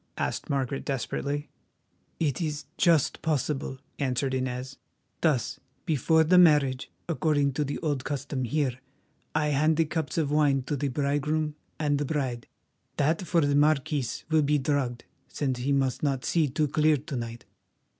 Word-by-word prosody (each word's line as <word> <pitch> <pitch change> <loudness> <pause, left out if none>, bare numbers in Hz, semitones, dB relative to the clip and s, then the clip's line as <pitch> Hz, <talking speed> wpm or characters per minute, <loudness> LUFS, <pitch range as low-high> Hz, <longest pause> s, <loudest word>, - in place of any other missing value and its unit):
asked - - -2
Margaret 135 -1 -1
desperately. 140 +2 -3 0.7
"It 150 -2 0
is 150 -3 -3
just 165 -6 +3
possible," 145 -3 -1 0.2
answered 130 -1 0
Inez; 130 0 -3 0.4
"thus, 150 -8 +1 0.3
before 160 +2 +3
the 180 +3 +5
marriage, 145 -6 +4 0.2
according 150 -4 +1
to 150 - 0
the 145 0 -3
old 145 -4 0
custom 140 -2 -3
here, 130 0 -1 0.6
I 150 -1 +2
hand 150 +2 +2
the 165 - +3
cups 160 -1 -3
of 150 -3 +1
wine 145 -3 +3
to 145 - -2
the 140 +1 -1
bridegroom 145 +3 0 0.2
and 145 -2 +1
the 145 - -1
bride. 130 -5 -2 0.5
That 155 +4 +2
for 170 -2 +3
the 145 -1 +2
marquis 145 -3 +1
will 160 -1 +5
be 150 +1 +2
drugged, 130 -3 -1 0.2
since 130 -4 -2
he 130 +3 -1
must 135 -2 +1
not 135 -3 0
see 165 -3 +2
too 150 +3 0
clear 155 +1 +3
to 145 +1 -6
night. 115 -1 -5
145 Hz, 155 wpm, -27 LUFS, 135-155 Hz, 0.7 s, the